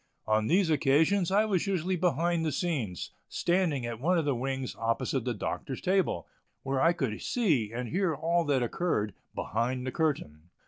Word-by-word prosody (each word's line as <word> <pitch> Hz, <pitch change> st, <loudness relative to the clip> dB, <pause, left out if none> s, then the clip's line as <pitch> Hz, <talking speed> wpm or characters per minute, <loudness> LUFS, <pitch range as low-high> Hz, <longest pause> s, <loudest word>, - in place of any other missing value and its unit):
On 110 Hz, 0 st, +2 dB
these 180 Hz, -1 st, +3 dB
occasions 160 Hz, +6 st, +3 dB
I 205 Hz, +3 st, +3 dB
was 195 Hz, -3 st, 0 dB
usually 185 Hz, -1 st, 0 dB
behind 170 Hz, -1 st, +1 dB
the 155 Hz, -, 0 dB
scenes, 130 Hz, -, -2 dB, 0.2 s
standing 170 Hz, -8 st, +1 dB
at 120 Hz, -1 st, -4 dB
one 175 Hz, +7 st, +2 dB
of 165 Hz, -, +1 dB
the 145 Hz, -, +2 dB
wings 130 Hz, +1 st, -3 dB
opposite 115 Hz, +2 st, -1 dB
the 125 Hz, -2 st, -1 dB
Doctor's 130 Hz, +5 st, -4 dB
table, 190 Hz, -1 st, 0 dB, 0.4 s
where 135 Hz, 0 st, 0 dB
I 165 Hz, -, +5 dB
could 135 Hz, -11 st, -2 dB
see 155 Hz, -, +1 dB
and 120 Hz, +1 st, -4 dB
hear 180 Hz, -, 0 dB
all 170 Hz, +3 st, +1 dB
that 140 Hz, -4 st, +2 dB
occurred 115 Hz, -, -1 dB, 0.2 s
"behind 125 Hz, +4 st, -1 dB
the 130 Hz, -, -2 dB
curtain." 90 Hz, -, -2 dB
145 Hz, 175 wpm, -29 LUFS, 120-175 Hz, 0.4 s, I